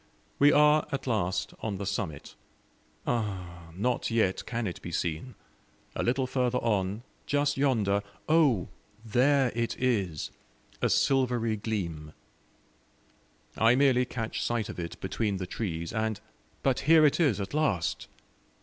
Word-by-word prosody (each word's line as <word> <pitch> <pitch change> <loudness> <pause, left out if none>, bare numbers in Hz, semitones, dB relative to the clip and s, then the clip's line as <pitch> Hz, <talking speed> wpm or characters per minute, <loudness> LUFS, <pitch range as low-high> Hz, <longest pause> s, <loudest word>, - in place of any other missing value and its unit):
We 145 +1 +7
are 150 +1 +5
at 135 - -3
last 100 -7 -1
on 105 -3 -3
the 100 - -4
summit. 85 -7 -4 0.7
Ah! 90 -7 -3
not 120 +6 0
yet 110 -5 +1
can 120 0 -2
it 90 - -5
be 85 - -7
seen. 85 +9 -3 0.6
A - - -1
little 130 +2 +1
further 125 -1 0
on 105 -2 -1 0.2
just 145 0 +1
yonder, 110 -8 +2 0.3
oh! 145 - +3 0.4
there 130 +3 +3
it 115 0 -2
is 100 -11 -1 0.5
a - - +2
silvery 125 -4 +2
gleam. 85 -8 -4 1.4
I 115 +2 +4
merely 130 -2 +4
catch 115 -3 -4
sight 115 -2 -1
of 105 - -7
it 85 -1 -6
between 100 +1 -1
the 95 - -4
trees, 85 -3 -4
and 110 -2 -1 0.4
but 135 -2 +2
here 160 -1 +8
it 145 - +3
is 140 - +3
at 100 +4 -5
last! 140 - 0
115 Hz, 140 wpm, -28 LUFS, 95-130 Hz, 1.4 s, here